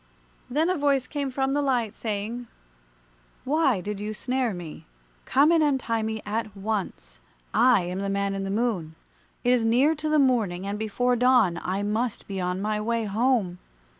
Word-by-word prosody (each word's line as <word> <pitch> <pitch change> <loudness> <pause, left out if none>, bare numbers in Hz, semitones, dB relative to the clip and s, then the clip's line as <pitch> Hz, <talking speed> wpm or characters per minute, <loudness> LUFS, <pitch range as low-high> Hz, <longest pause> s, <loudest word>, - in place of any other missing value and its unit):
Then 300 +6 +1
a 370 - +1
voice 280 -3 +2
came 280 0 -3
from 265 +1 -1
the 290 - +1
light, 245 -6 0
saying, 225 +2 -4 1.0
"Why 275 - +2
did 205 +1 -5
you 210 +1 -4
snare 250 +1 -1
me? 175 -5 -8 0.4
Come 290 +4 +4
and 330 -1 +4
untie 265 -6 +1
me 220 0 -3
at 210 -1 -3
once. 195 - -4 0.3
I 250 -5 +5
am 180 +2 -4
the 200 0 -2
Man 200 0 0
in 195 0 -3
the 195 - -3
Moon. 195 -7 -1 0.5
It 245 - +3
is 245 -2 +2
near 250 +7 +4
to 310 0 -4
the 305 - +3
morning, 220 -10 +2
and 200 +1 -3
before 245 +3 0
dawn 240 -8 +3
I 190 +2 -2
must 220 +3 -2
be 195 -2 -4
on 180 +1 -1
my 210 0 -1
way 230 +1 0
home. 210 -4 +1
225 Hz, 180 wpm, -26 LUFS, 200-255 Hz, 1.0 s, I